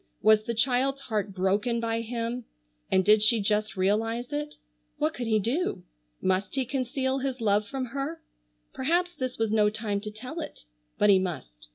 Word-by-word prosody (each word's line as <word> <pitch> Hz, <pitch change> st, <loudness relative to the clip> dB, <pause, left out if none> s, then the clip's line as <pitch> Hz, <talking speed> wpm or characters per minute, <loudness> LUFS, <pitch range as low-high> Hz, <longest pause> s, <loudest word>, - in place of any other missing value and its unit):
Was 215 Hz, 0 st, +5 dB
the 235 Hz, -, -2 dB
child's 265 Hz, +3 st, +2 dB
heart 215 Hz, -5 st, -2 dB
broken 200 Hz, +5 st, +1 dB
by 230 Hz, 0 st, -1 dB
him, 235 Hz, +1 st, -3 dB, 0.4 s
and 190 Hz, -1 st, +3 dB
did 210 Hz, 0 st, +6 dB
she 225 Hz, +2 st, +4 dB
just 210 Hz, 0 st, 0 dB
realize 225 Hz, +7 st, 0 dB
it? 295 Hz, 0 st, -3 dB, 0.4 s
What 155 Hz, -, +1 dB
could 240 Hz, -2 st, -4 dB
he 220 Hz, -1 st, +3 dB
do? 245 Hz, -, -1 dB, 0.4 s
Must 190 Hz, +3 st, 0 dB
he 265 Hz, -1 st, +1 dB
conceal 260 Hz, +1 st, -1 dB
his 265 Hz, -1 st, -2 dB
love 210 Hz, -2 st, +2 dB
from 265 Hz, +3 st, -3 dB
her? 275 Hz, +6 st, -4 dB, 0.5 s
Perhaps 350 Hz, +6 st, +1 dB
this 255 Hz, -5 st, -4 dB
was 225 Hz, -1 st, 0 dB
no 210 Hz, -1 st, +4 dB
time 210 Hz, -2 st, -2 dB
to 210 Hz, -, -5 dB
tell 250 Hz, +10 st, -7 dB
it. 300 Hz, -, -8 dB, 0.4 s
But 210 Hz, -, +5 dB
he 190 Hz, -, +6 dB
must. -, -, -5 dB
230 Hz, 180 wpm, -28 LUFS, 210-260 Hz, 0.5 s, did